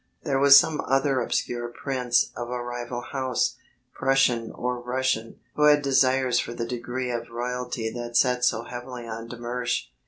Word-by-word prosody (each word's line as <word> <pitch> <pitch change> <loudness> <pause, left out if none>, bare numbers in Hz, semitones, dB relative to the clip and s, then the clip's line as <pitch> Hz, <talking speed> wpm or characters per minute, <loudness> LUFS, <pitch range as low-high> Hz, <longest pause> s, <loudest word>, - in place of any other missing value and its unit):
There 135 -3 0
was 140 0 +9
some 155 0 -1
other 135 -1 +2
obscure 120 0 -2
prince 125 0 0
of 120 0 -5
a 125 0 -3
rival 120 0 -5
house, 130 0 -1 0.4
Prussian 130 -4 +2
or 125 0 -3
Russian, 125 -2 -2 0.2
who 150 - +3
had 150 -1 +5
desires 130 -2 +3
for 120 - -4
the 115 - -3
degree 125 +1 -4
of 115 -1 -4
royalty 120 -1 -3
that 120 0 -3
sat 125 -1 +2
so 115 -2 +2
heavily 125 0 -8
on 115 0 -6
de 120 - -8
Mersch. 120 +1 -2
125 Hz, 165 wpm, -25 LUFS, 120-130 Hz, 0.4 s, was